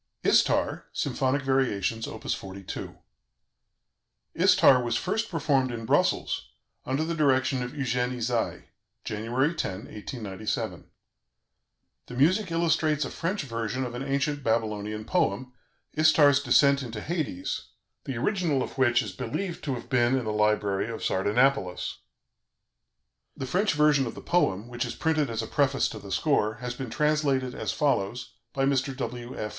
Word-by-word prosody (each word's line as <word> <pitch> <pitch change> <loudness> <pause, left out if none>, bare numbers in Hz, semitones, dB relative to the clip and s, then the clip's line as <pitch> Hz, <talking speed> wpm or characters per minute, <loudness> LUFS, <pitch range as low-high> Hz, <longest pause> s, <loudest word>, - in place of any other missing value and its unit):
"ISTAR," - - +2
SYMPHONIC 135 +1 0
VARIATIONS: 115 -5 0
Op. - - -8
42 95 -1 -5 1.4
"Istar" 130 -2 +5
was 120 -1 -1
first 220 +4 -1
performed 140 -6 +1
in 115 -1 -5
Brussels, 65 - +1 0.4
under 135 +4 0
the 165 +1 -2
direction 135 -4 +2
of 125 0 -4
Eugène 125 -3 -1
Ysaye, 120 -1 -2 0.3
January 120 +8 0
10, 165 - -2
1897. 105 - -5 1.2
The 125 - -8
music 185 - +3
illustrates 160 -3 +1
a - - -6
French 185 +1 -2
version 115 0 -3
of 120 - -6
an 120 - -5
ancient 140 +1 -1
Babylonian 110 -2 -1
poem, 125 - 0 0.4
"Istar's 150 -3 +5
Descent 140 +2 +4
into 115 -4 -6
Hades," 145 - -3 0.4
the 130 - -4
original 160 - +1
of - - -8
which 125 -1 +4
is 105 - -5
believed 170 - -4
to 135 -3 -1
have 120 - -8
been 125 0 +3
in 125 - -2
the 110 - -1
library 105 -1 +1
of 115 - -6
Sardanapalus. 105 -1 +1 1.4
The 135 - -3
French 185 +8 +1
version 150 -3 +3
of - - -6
the - - -8
poem, 115 - +1
which 120 0 -3
is - - -4
printed 155 -4 +1
as 115 -1 -2
a - - -5
preface 135 -2 +2
to 110 - -7
the 100 -1 -10
score, 110 - +1
has 125 +1 -5
been 130 -1 -6
translated 140 -2 +1
as - - -3
follows 125 -5 -1 0.2
by 135 -1 0
Mr. 135 -1 0
W. 120 -1 -5
F. 105 - -3
130 Hz, 150 wpm, -27 LUFS, 115-145 Hz, 1.4 s, Istar